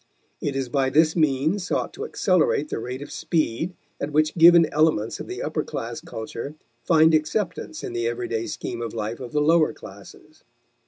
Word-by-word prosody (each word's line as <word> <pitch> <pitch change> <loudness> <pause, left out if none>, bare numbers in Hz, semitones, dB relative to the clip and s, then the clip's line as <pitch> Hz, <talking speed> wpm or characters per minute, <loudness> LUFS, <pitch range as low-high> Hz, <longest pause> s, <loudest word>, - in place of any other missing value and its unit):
It 140 - -2
is 135 -1 -1
by 135 +2 +1
this 155 +3 +3
means 155 +4 +1
sought - - -1
to 440 - -5
accelerate 465 -5 +1
the - - -3
rate 130 +3 -5
of 145 - -11
speed 160 +2 -1 0.3
at 145 - -2
which 155 +1 +2
given 170 0 +7
elements 150 -8 +1
of - - -7
the - - -5
upper - - -2
class - - -5
culture 115 +6 -7 0.3
find 160 -1 +5
acceptance 180 - -1
in 390 -3 -5
the 360 +3 -1
everyday 380 -3 -2
scheme 120 - -5
of 115 -1 -5
life 110 +1 -3
of 125 -2 -7
the 150 - +1
lower 160 +1 +4
classes. - - -14
155 Hz, 180 wpm, -24 LUFS, 135-180 Hz, 0.3 s, given